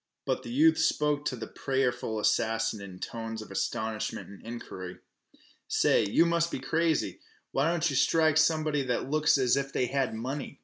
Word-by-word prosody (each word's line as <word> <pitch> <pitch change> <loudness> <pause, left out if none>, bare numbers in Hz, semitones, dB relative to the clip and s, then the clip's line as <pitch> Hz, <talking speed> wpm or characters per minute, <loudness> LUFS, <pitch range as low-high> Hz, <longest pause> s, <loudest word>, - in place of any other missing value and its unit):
But - - -1
the - - -9
youth 310 +6 +4
spoke 150 -1 +1
to 130 - -1
the 115 - -6
prayerful 130 -5 -1
assassin 110 0 +1
in 95 -2 -9
tones 115 +3 -5
of 110 -2 -9
astonishment 110 +2 -3
and 100 - -12
inquiry. 95 -6 -7 0.7
"Say, - - +3
you 165 +11 +3
must 170 0 +1
be - - -3
crazy! 160 +4 0 0.3
Why 140 +4 +2
don't 170 0 +1
yeh 140 - -1
strike 160 +2 +3
somebody 155 -2 +2
that 130 +1 -2
looks 155 -1 +4
as 130 -2 +3
if 135 0 -2
they 125 - 0
had 130 -3 -1
money?" 135 +5 -5
135 Hz, 175 wpm, -29 LUFS, 115-155 Hz, 0.7 s, youth